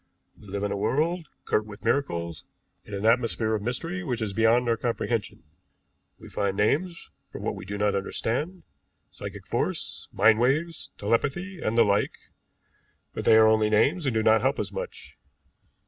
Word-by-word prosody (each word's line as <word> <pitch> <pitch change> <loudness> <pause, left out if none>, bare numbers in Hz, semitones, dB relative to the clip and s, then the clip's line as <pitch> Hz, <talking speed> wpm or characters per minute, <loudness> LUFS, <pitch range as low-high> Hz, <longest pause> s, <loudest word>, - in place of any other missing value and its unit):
We 105 - -17
live 100 +1 -4
in 100 - -1
a - - -1
world 155 - 0 0.2
girt 105 0 +1
with 105 0 -11
miracles, 85 - -1 0.4
in 105 - -7
an 100 +2 -3
atmosphere 115 -1 +2
of 110 - -1
mystery 165 - -3
which 125 -7 -2
is 110 -3 -2
beyond 115 +3 +3
our 115 - +3
comprehension. 115 -4 -2 0.7
We - - -13
find 100 -1 -2
names 165 - 0 0.2
for - - -7
what - - -2
we - - -8
do 100 +2 -5
not 105 0 +1
understand, 125 - -2 0.5
psychic - - -8
force, - - -2
mind 110 -1 +4
waves, 150 +7 0
telepathy, 145 - -1
and 110 +2 -1
the 115 - +7
like, 100 0 +1 1.0
but - - -5
they - - +7
are 110 0 +7
only 110 -1 +4
names 140 - +2
and 125 - 0
do 110 - +2
not 110 0 +5
help 135 +2 +1
us - - -3
much. - - -7
115 Hz, 175 wpm, -26 LUFS, 105-140 Hz, 1.0 s, the